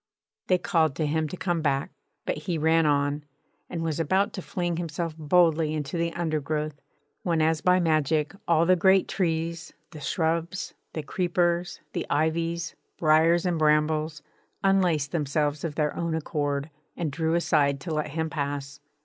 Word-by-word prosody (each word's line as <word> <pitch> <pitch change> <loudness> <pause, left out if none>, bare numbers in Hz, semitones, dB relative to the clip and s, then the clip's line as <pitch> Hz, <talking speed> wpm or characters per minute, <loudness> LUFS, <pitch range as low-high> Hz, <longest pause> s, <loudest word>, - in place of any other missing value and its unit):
They 185 - +4
called 160 -5 +1
to 155 - 0
him 155 +1 0
to 185 - -7
come 175 -3 -1
back, 140 -2 0 0.3
but - - -1
he 175 -3 -2
ran 160 +1 +3
on, 145 0 +1 0.5
and 165 -2 -3
was 160 -2 -2
about 190 +7 +1
to 190 - -5
fling 175 -2 -2
himself 165 -1 -3
boldly 160 0 +3
into 150 +1 -4
the 170 0 0
undergrowth, 155 -3 -2 0.4
when 170 -3 0
as 160 0 +2
by 180 0 +4
magic 155 -2 +1
all 165 -1 +4
the 185 +1 +5
great 190 +2 +4
trees, 165 -2 -2 0.2
the 155 - -9
shrubs, 165 +3 -1 0.2
the 155 - -4
creepers, 175 +1 0
the - - -3
ivies, 165 +2 0 0.2
briars 165 +2 +4
and 175 -3 0
brambles, 155 0 +2 0.4
unlaced 180 -7 +2
themselves 150 -1 0
of 160 -3 -3
their 150 -2 0
own 170 -1 -1
accord 145 -2 -2 0.3
and 165 -4 -2
drew 160 +2 0
aside 145 -5 +2
to 165 0 -4
let 150 0 -1
him 160 +2 -2
pass. 145 -1 -4
160 Hz, 160 wpm, -26 LUFS, 150-170 Hz, 0.5 s, the